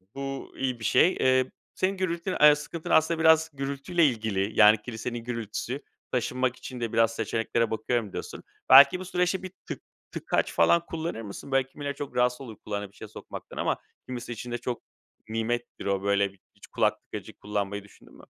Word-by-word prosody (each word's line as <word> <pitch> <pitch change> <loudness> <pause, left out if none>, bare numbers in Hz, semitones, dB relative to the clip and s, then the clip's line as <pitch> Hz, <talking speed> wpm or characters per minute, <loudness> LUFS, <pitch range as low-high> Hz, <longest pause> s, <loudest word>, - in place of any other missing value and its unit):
bu 135 0 -5
iyi 130 -3 -1
bir - - -9
şey. 180 - +5
Eee, 130 0 +3 0.2
senin 190 +1 0
gürültün 185 0 -2
eee, 150 0 +9
sıkıntın 150 +2 -7
aslında 160 +1 +3
biraz 160 0 +5
gürültüyle 140 +5 0
ilgili. 110 -6 0
Yani 105 0 +7
kilisenin 120 +1 -5
gürültüsü, 115 +3 -4 0.3
taşınmak 125 +1 0
için 130 0 -8
de 115 -2 -3
biraz 115 0 +3
seçeneklere 115 0 0
bakıyorum, 110 -2 -1
diyorsun. - - -6 0.3
Belki 140 +6 +9
bu 185 - -6
süreçte 180 +1 0
bir 185 - -6
tık - - -6 0.3
tıkaç - - -1
falan 170 0 +4
kullanır 160 -7 -4
mısın? 105 +5 -8
Böyle, 135 -1 +2
kimileri 140 +1 -5
çok 140 -3 -7
rahatsız 125 +1 +2
olur 115 -5 -8
kulağına 105 -1 -3
bir - - -27
şeye - - -9
sokmaktan - - -10
ama - - 0 0.3
kimisi 125 -1 -6
için 120 +1 -6
de 120 - -1
çok 120 0 -4 0.5
nimettir 115 +2 -3
o, 100 -1 0
böyle, 100 0 +2 0.2
hiç - - -15
kulak - - +1
tıkacı - - -8
kullanmayı 100 -1 -3
düşündün 100 - -19
mü? - - -16
125 Hz, 180 wpm, -27 LUFS, 110-145 Hz, 0.5 s, eee